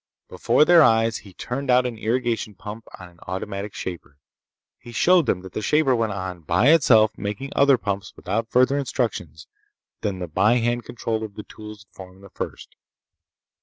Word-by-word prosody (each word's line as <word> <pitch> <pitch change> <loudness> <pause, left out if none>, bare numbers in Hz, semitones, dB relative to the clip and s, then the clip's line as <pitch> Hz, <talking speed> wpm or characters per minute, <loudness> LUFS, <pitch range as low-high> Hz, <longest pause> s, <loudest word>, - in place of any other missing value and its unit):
Before 150 - +2
their 175 0 +7
eyes 115 -4 +3
he 100 - -15
turned 135 +3 -5
out 125 0 +4
an 125 -2 -3
irrigation 115 -2 -1
pump 105 +3 -9
on 90 - -11
an 85 -1 -21
automatic 100 +2 -5
shaper. 80 -6 -7 0.6
He 120 - -12
showed 175 +5 +3
them 90 - 0
that 95 -1 -11
the - - -3
shaper 150 0 +2
went 115 -2 0
on, 95 -2 -5
by 90 - +2
itself, 110 -9 +5
making 105 +7 -5
other 140 -2 +5
pumps 100 -3 -4
without 110 +5 -3
further 130 +4 +3
instructions 110 - -3 0.6
than 100 -3 -2
the 90 -1 -5
by 105 +8 +2
hand 120 0 0
control 110 -1 -3
of 105 -2 -8
the 105 - -7
tools 105 -1 -11
that 95 - -44
formed 95 0 -13
the 100 - -14
first. - - -7
110 Hz, 180 wpm, -23 LUFS, 95-125 Hz, 0.6 s, their